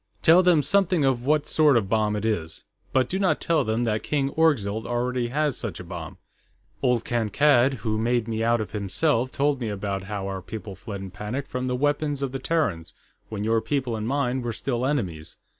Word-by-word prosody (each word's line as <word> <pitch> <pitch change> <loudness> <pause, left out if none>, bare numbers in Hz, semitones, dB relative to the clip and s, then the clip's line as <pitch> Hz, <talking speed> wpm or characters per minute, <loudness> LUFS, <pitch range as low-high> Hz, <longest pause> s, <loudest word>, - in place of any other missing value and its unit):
"Tell 170 +3 +7
them 175 -5 +4
something 185 -1 +2
of 130 -1 0
what 150 0 +3
sort 150 -5 +4
of 115 - +2
a - - -8
bomb 105 0 +1
it 105 +1 -3
is. 85 -8 -2 0.3
But 130 -2 +2
do 190 - -2
not 195 -2 +2
tell 160 -4 +1
them 110 +1 0
that 110 -2 0
King 140 -2 -1
Orgzild 110 -10 +1
already 120 0 -1
has 145 +1 0
such - - -4
a - - -7
bomb. - - -8 0.6
Old 125 -2 +1
Kankad, 120 +3 +3
who 110 -1 0
made 120 0 +1
me 110 -1 -2
out 115 0 +2
of 110 - -5
himself, 115 - 0
told 140 -1 0
me 115 - -2
about 100 -1 -3
how 100 -1 -4
our 95 -1 -4
people 105 +1 -7
fled 100 +1 -7
in 95 -1 -7
panic 115 +8 -4
from 125 -1 -4
the 125 - 0
weapons 145 +1 0
of 135 - -2
the 135 - -4
Terrans, 130 - -1 0.3
when 105 -2 -4
your 115 +1 +2
people 130 -4 -1
and 110 0 -3
mine 130 -1 0
were 120 -1 -3
still 125 +3 -2
enemies. 90 - -3
120 Hz, 210 wpm, -25 LUFS, 110-140 Hz, 0.6 s, Tell